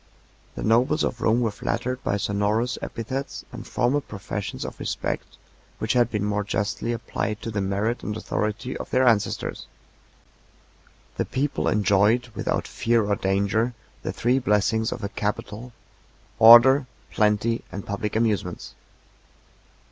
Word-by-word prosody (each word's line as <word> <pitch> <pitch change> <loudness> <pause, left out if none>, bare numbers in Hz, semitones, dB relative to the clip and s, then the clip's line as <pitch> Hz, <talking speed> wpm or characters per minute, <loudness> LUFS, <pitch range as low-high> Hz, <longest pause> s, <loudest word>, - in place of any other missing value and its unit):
The - - -5
nobles 125 +8 +3
of 120 - -2
Rome 115 +2 +3
were 115 -3 +1
flattered 125 +5 -3
by 100 - 0
sonorous 105 +4 0
epithets 130 +4 -5
and - - -9
formal 125 +4 +1
professions 105 -4 -5
of - - -8
respect, - - -4 0.4
which - - -1
had 120 -2 +3
been 105 -3 -1
more 105 0 0
justly 105 +3 -2
applied 115 -2 -3
to 115 - -4
the 105 -1 -1
merit 100 +5 -1
and 105 0 -4
authority 110 +4 -3
of - - -6
their 130 +1 +3
ancestors. 110 -4 0 1.5
The - - 0
people 130 - -1
enjoyed, 105 +5 +3
without - - -2
fear 115 -2 +1
or 100 0 +1
danger, 100 +5 0 0.3
the - - -3
three 125 +3 +1
blessings 110 -1 +1
of 115 - -5
a 100 - -2
capital, 105 +3 -4 0.7
order, 125 +4 +8 0.2
plenty, 105 +2 +1
and 100 - -6
public 100 +1 -3
amusements. 105 -6 -1
110 Hz, 140 wpm, -24 LUFS, 105-120 Hz, 1.5 s, order